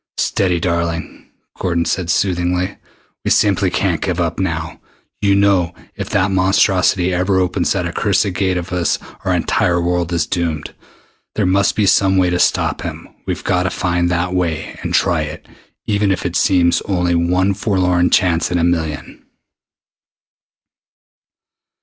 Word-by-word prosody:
"Steady, 90 -3 0
darling," 85 -1 -3 0.3
Gordon 85 -2 0
said 90 -3 -2
soothingly. 90 0 0 0.5
"We - - -1
simply 100 -2 +3
can't 90 -3 -1
give 90 -2 -2
up 85 -1 -1
now, 80 -3 -3 0.4
you 100 -1 +3
know. 95 -4 +2 0.2
If - - -5
that 95 +2 +1
monstrosity 95 -1 +2
ever 95 +2 +1
opens 90 -1 0
that 95 -3 -2
accursed 100 +2 0
Gate 95 -1 0
of 90 +1 -5
his 90 -2 0 0.3
our - - -1
entire 85 0 +1
world 85 0 -1
is 85 -3 0
doomed. 85 -4 -3 0.6
There 105 - +1
must 95 +2 +2
be 105 - +2
some 95 0 +3
way 90 -1 +2
to 90 - 0
stop - - +1
him. - - -7 0.2
We've - - -3
got 90 - +1
to 90 - 0
find 85 0 0
that 90 +1 -1
way 85 -4 -2
and - - -4
try - - +2
it - - -7 0.4
even 105 -2 +1
if 95 - -2
it 90 0 -2
seems 90 -3 +3
only 90 -3 0
one 90 +3 +1
forlorn 90 -3 +1
chance 85 -2 +2
in 90 - 0
a 85 - +1
million." 80 -3 -2
90 Hz, 155 wpm, -17 LUFS, 85-95 Hz, 0.6 s, simply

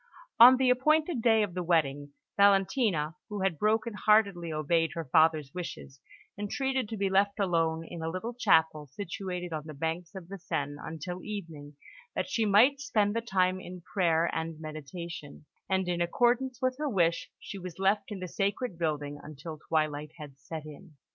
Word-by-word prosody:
On 250 +3 +10
the 260 -1 +4
appointed 305 +2 +2
day 225 -2 +4
of 195 -4 -3
the 180 - -2
wedding, 145 -4 0 0.2
Valentina, 195 - +3
who 205 -2 -4
had 180 -6 0
broken 220 +2 +1
heartedly 200 -5 +2
obeyed 160 +2 +1
her 165 -1 -4
father's 155 0 +3
wishes, 165 -6 -7 0.4
entreated 260 +3 -1
to 220 - -4
be 200 0 +1
left 200 +2 +2
alone 165 -4 +1
in 170 0 -8
a 160 - -2
little 185 +8 -4
chapel 160 -9 +2
situated 180 0 -5
on 155 0 -5
the 155 - -8
banks 165 +5 -3
of 185 -3 -8
the 195 +1 -8
Seine 145 -3 -3
until 170 +3 -6
evening, 165 -8 -7 0.4
that - - -1
she 230 -6 0
might 240 +8 +5
spend 215 -7 +1
the 230 - 0
time 185 -4 +1
in 180 -1 -9
prayer 170 -4 +3
and 160 -1 -3
meditation; 155 0 -8 0.2
and 190 -1 +1
in 175 -1 -1
accordance 245 +7 +1
with 255 0 0
her 300 -1 -1
wish, 170 -7 +1
she 200 - -8
was 180 -2 -8
left 195 +1 +2
in 200 - -5
the 185 - -4
sacred 200 +1 -2
building 145 -3 -2
until 155 +1 -9
twilight 155 -1 -1
had 145 -3 -11
set 155 +4 -7
in. 155 +3 -12
180 Hz, 175 wpm, -29 LUFS, 160-210 Hz, 0.4 s, On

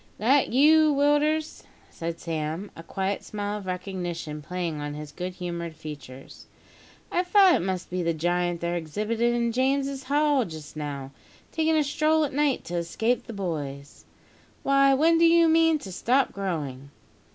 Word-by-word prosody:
"That 265 +6 +3
you, 305 +4 +5
Willders?" 295 +2 +1 0.3
said 165 0 -5
Sam, 160 +4 -4
a - - -9
quiet 195 +3 -3
smile 205 0 -4
of 195 - -11
recognition 175 -4 -4
playing 170 -1 -4
on 145 0 -5
his 150 0 -8
good 180 +4 -5
humoured 170 -2 -5
features. 145 -4 -10 0.6
"I 355 - +2
thought 370 0 +5
it - - +2
must 185 0 -3
be 180 0 -1
the 170 -1 +1
giant 175 +1 0
they're 170 0 -1
exhibitin' 215 +8 -1
in 240 - +2
Saint 235 -1 0
James's 270 +2 0
Hall 290 -1 +2
just 155 -6 -9
now, 140 -3 -5 0.4
takin' 320 0 +1
a 305 - +3
stroll 310 +2 +2
at 275 - -6
night 290 -1 +1
to 175 - -4
escape 220 +10 -1
the 230 - -6
boys. 145 -8 -5 0.6
Why, 275 0 +4
when 325 +4 +4
do 335 - +6
you 335 0 +5
mean 325 0 +4
to 195 -10 -9
stop 250 +8 +1
growing?" 145 -9 -4
195 Hz, 165 wpm, -26 LUFS, -, 0.6 s, do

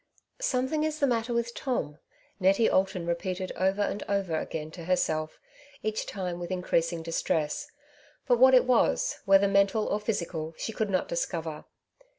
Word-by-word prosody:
'^ - - -8
Something 265 - 0
is 310 -1 -1
the 285 - +2
matter 240 -2 0
with 235 0 -1
Tom/^ 155 - -3 0.4
Nettie 195 +4 +4
Alton 190 -2 +1
repeated 185 +2 -2
over 190 +2 +1
and 205 - -2
over 195 -4 0
agaiii 155 0 -3
to 170 -2 -8
het'self, 155 -3 0 0.5
each 215 0 -2
time 180 -3 -4
with 175 - -5
increasing 170 -2 0
distress; 160 -2 -1 0.6
but 245 -1 +3
what 260 +1 +8
it 255 - +6
was, - - +2
whether 195 0 +6
mental 200 +2 +3
or 205 - 0
physical, 170 -7 -3
she 225 - -4
could 215 -1 -1
not 185 -2 0
discover. 165 -2 -3
190 Hz, 165 wpm, -28 LUFS, 170-225 Hz, 0.6 s, what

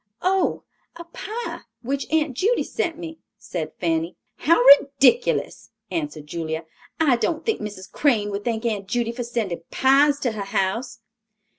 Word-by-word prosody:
"Oh, 380 +1 +1 0.3
a 340 - -8
pie, 435 +7 -6 0.2
which 275 +3 -3
Aunt 310 -3 +1
Judy 420 - +1
sent 335 -2 -3
me," 325 -2 -8 0.2
said 185 -8 -5
Fanny. 165 -1 -1 0.2
"How 335 -1 +3 0.2
ridiculous," 280 - +1 0.2
answered 300 - -4
Julia; 160 +1 -4 0.3
"I 285 -7 +4
don't 320 +6 -1
think 445 - 0
Mrs. 200 -3 -7
Crane 220 -8 +1
would 200 +1 -4
thank 230 0 -2
Aunt 205 -4 -2
Judy 235 +2 -1
for 245 +1 -5
sending 225 -8 -3
pies 280 +2 +4
to 245 - 0
her 210 -2 -5
house." 220 +5 -2
245 Hz, 150 wpm, -23 LUFS, 200-315 Hz, 0.3 s, I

